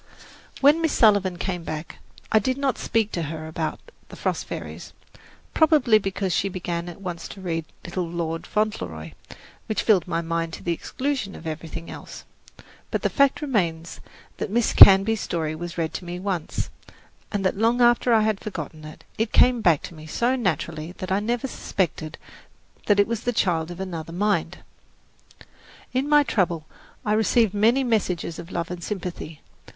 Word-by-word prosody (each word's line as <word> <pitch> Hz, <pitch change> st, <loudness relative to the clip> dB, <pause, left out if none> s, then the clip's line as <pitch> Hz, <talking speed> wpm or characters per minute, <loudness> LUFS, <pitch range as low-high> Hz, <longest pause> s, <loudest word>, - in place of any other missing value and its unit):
When 295 Hz, +4 st, +6 dB
Miss 320 Hz, -2 st, +1 dB
Sullivan 200 Hz, -5 st, +4 dB
came 180 Hz, -1 st, -3 dB
back, 155 Hz, 0 st, -6 dB, 0.3 s
I 220 Hz, -, +6 dB
did 255 Hz, +5 st, -1 dB
not 275 Hz, -2 st, 0 dB
speak 220 Hz, -2 st, 0 dB
to 170 Hz, -, -2 dB
her 155 Hz, 0 st, -5 dB
about 160 Hz, 0 st, -3 dB, 0.3 s
"The -, -, -10 dB
Frost -, -, -2 dB
Fairies," -, -, -7 dB, 0.6 s
probably 295 Hz, -9 st, +5 dB
because 195 Hz, -2 st, -2 dB
she 195 Hz, -, +1 dB
began 175 Hz, -2 st, -4 dB
at 175 Hz, -, -10 dB
once 180 Hz, -3 st, -5 dB
to -, -, -10 dB
read 165 Hz, -4 st, -3 dB, 0.2 s
"Little 180 Hz, 0 st, -3 dB
Lord 165 Hz, -1 st, -3 dB
Fauntleroy," 90 Hz, -, -2 dB, 0.6 s
which 215 Hz, -, -1 dB
filled 195 Hz, -7 st, +3 dB
my 170 Hz, -1 st, -1 dB
mind 165 Hz, 0 st, -2 dB
to -, -, -8 dB
the 170 Hz, -, 0 dB
exclusion 255 Hz, -, -3 dB
of -, -, -11 dB
everything 165 Hz, +1 st, -6 dB
else. -, -, -9 dB, 0.7 s
But -, -, -2 dB
the -, -, +1 dB
fact 280 Hz, +1 st, +3 dB
remains 170 Hz, -, -1 dB, 0.4 s
that -, -, -3 dB
Miss 230 Hz, +2 st, +1 dB
Canby's 200 Hz, +3 st, +8 dB
story 160 Hz, -3 st, -2 dB
was 170 Hz, +2 st, -6 dB
read 160 Hz, -1 st, -1 dB
to 180 Hz, -, -5 dB
me 175 Hz, +1 st, -5 dB
once, 185 Hz, -4 st, -3 dB, 0.6 s
and 200 Hz, -2 st, -1 dB
that 185 Hz, -, +2 dB
long 230 Hz, +4 st, +2 dB
after 240 Hz, 0 st, +4 dB
I 225 Hz, -1 st, +5 dB
had 215 Hz, -2 st, +1 dB
forgotten 160 Hz, -6 st, -6 dB
it, 155 Hz, -, -11 dB, 0.2 s
it 225 Hz, 0 st, 0 dB
came 250 Hz, -2 st, +5 dB
back 170 Hz, -7 st, +3 dB
to -, -, -8 dB
me 155 Hz, -1 st, -11 dB
so 240 Hz, +10 st, +1 dB
naturally 170 Hz, -, -2 dB
that 185 Hz, 0 st, -6 dB
I 190 Hz, -, +3 dB
never 235 Hz, +4 st, -1 dB
suspected 165 Hz, -, -3 dB, 0.7 s
that 205 Hz, -1 st, +4 dB
it 205 Hz, -, +6 dB
was 230 Hz, 0 st, -2 dB
the 245 Hz, -, -1 dB
child 165 Hz, -6 st, +1 dB
of 175 Hz, +1 st, -8 dB
another 165 Hz, -4 st, -5 dB
mind. 190 Hz, -2 st, 0 dB, 1.3 s
In 265 Hz, +3 st, 0 dB
my 295 Hz, -1 st, +6 dB
trouble 175 Hz, -, 0 dB, 0.4 s
I 210 Hz, -, +2 dB
received 220 Hz, -1 st, +3 dB
many 230 Hz, +6 st, +3 dB
messages 185 Hz, -8 st, -1 dB
of 170 Hz, -, -9 dB
love 170 Hz, 0 st, -3 dB
and 175 Hz, -1 st, -6 dB
sympathy. 175 Hz, -6 st, -5 dB
185 Hz, 175 wpm, -24 LUFS, 165-220 Hz, 1.3 s, Canby's